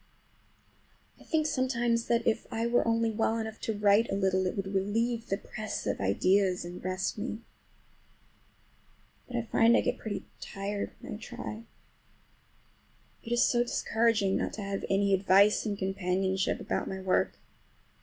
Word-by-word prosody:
I - - -15
think 315 -1 0
sometimes 240 -5 +1
that 235 -1 +1
if 225 - 0
I 225 +1 -1
were 235 0 +2
only 230 0 +2
well 225 +1 0
enough 220 -1 -5
to 220 -2 -2
write 210 +2 +4
a - - -1
little 190 -1 +1
it - - -3
would 195 0 -3
relieve 225 +4 0
the 195 - 0
press 215 +1 -6
of - - -1
ideas 180 - +2
and 175 +1 -8
rest 185 +3 -2
me. 220 0 -4 1.9
But 250 - -7
I 235 - 0
find 230 +1 +4
I - - +3
get - - -1
pretty 205 -3 -5
tired 200 +1 -4
when - - -7
I - - -5
try. 225 0 -7 1.6
It 230 - -9
is 240 0 +4
so 240 - +2
discouraging 225 -4 +1
not - - -2
to 210 - -5
have 195 0 -3
any 195 0 +2
advice 195 +3 +4
and 205 -1 -2
companionship 190 0 0
about - - -2
my 190 - -4
work. 185 -1 +1
210 Hz, 160 wpm, -30 LUFS, 195-230 Hz, 1.9 s, write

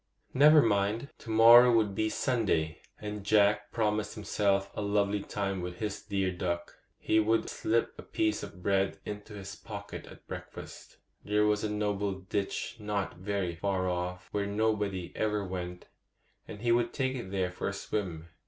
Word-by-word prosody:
Never 150 +3 +7
mind; 105 +4 +1
to - - -11
morrow 115 +2 +8
would 105 -3 +2
be 110 +2 0
Sunday, 100 - 0 0.2
and 105 -1 -5
Jack 105 0 +3
promised 105 -1 0
himself 100 -2 0
a - - -4
lovely 100 0 +1
time 100 -2 -3
with 90 0 -5
his 105 0 -3
dear 95 -3 -1
cluck. 85 -1 -3 0.2
He 110 - +2
would 110 +1 +2
slip 115 +1 0
a - - -4
piece 110 -1 0
of 95 -3 -9
bread 95 -1 +1
into 105 +1 -7
his 100 0 -7
pocket - - -8
at - - -14
breakfast; - - -9 0.3
there 105 0 +2
was 105 0 +2
a 110 - 0
noble 105 -1 -1
ditch 95 +4 -3
not 105 -4 -3
very 95 -1 -2
far 95 +1 -1
off, 90 0 -3
where 100 -1 -1
nobody 100 -4 0
ever 105 -2 0
went, 90 -1 -5 0.6
and 105 - -9
he 120 - +3
would 120 0 +2
take 130 -1 0
it 120 -7 -5
there 95 -2 -1
for 90 - -4
a 100 - -2
swim. 90 -5 -4
100 Hz, 170 wpm, -30 LUFS, 95-110 Hz, 0.6 s, morrow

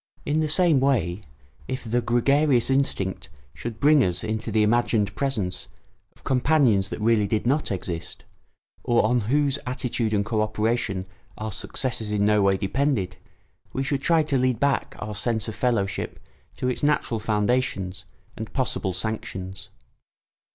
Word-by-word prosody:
In 150 +2 +1
the 155 -1 0
same 165 -3 +5
way, 110 -9 +1 0.5
if 130 - -4
the 120 +1 0
gregarious 130 +2 +2
instinct 115 -11 0 0.2
should 115 - -6
bring 145 +1 +5
us 90 +1 -1
into 110 +1 -3
the 110 0 +3
imagined 105 -2 +1
presence 110 -10 -1 0.5
of - - -23
companions 125 -7 +3
that - - -5
really 110 -1 +3
did 105 +2 -1
not 140 +2 +1
exist, 85 -3 -5 0.6
or 120 -3 +3
on 120 +3 +2
whose 140 0 +2
attitude 125 -3 -2
and 105 -1 +1
co 110 0 0
operation 110 -3 -1 0.3
our 110 0 -4
successes 110 0 -2
in 100 -1 +1
no 105 0 +4
way 100 -1 +3
depended, 105 -2 -1 0.6
we 135 - -1
should 140 0 -1
try 165 +2 +3
to 145 -3 0
lead 125 -2 +1
back 140 +1 0
our 105 0 -5
sense 110 +2 -1
of 110 - -4
fellowship 105 -5 -1 0.4
to 125 - -2
its 125 - -1
natural 145 -6 +1
foundations 105 -4 -1 0.3
and 110 -1 -7
possible 115 -7 -1
sanctions. 95 -2 -5
115 Hz, 150 wpm, -25 LUFS, 105-135 Hz, 0.6 s, same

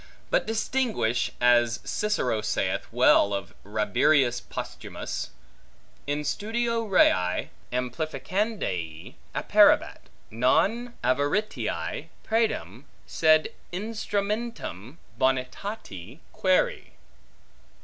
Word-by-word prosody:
But - - +2
distinguish, 225 - 0
as 120 -1 +4
Cicero 170 - 0
saith 105 - -1
well 100 0 +4
of 100 - -6
Rabirius 120 +5 +2
Posthumus, - - -6 0.8
In 145 +1 -1
studio 230 +7 -1
rei 90 - +3 0.2
amplificandae 125 - -3 0.2
apparebat, - - +3 0.2
non 210 - +1
avaritiae 145 - -1 0.2
praedam, 145 - -1 0.2
sed 155 -1 +3 0.2
instrumentum 205 - -3 0.2
bonitati 130 - -2 0.2
quaeri. 185 -1 +1
150 Hz, 70 wpm, -26 LUFS, -, 0.8 s, as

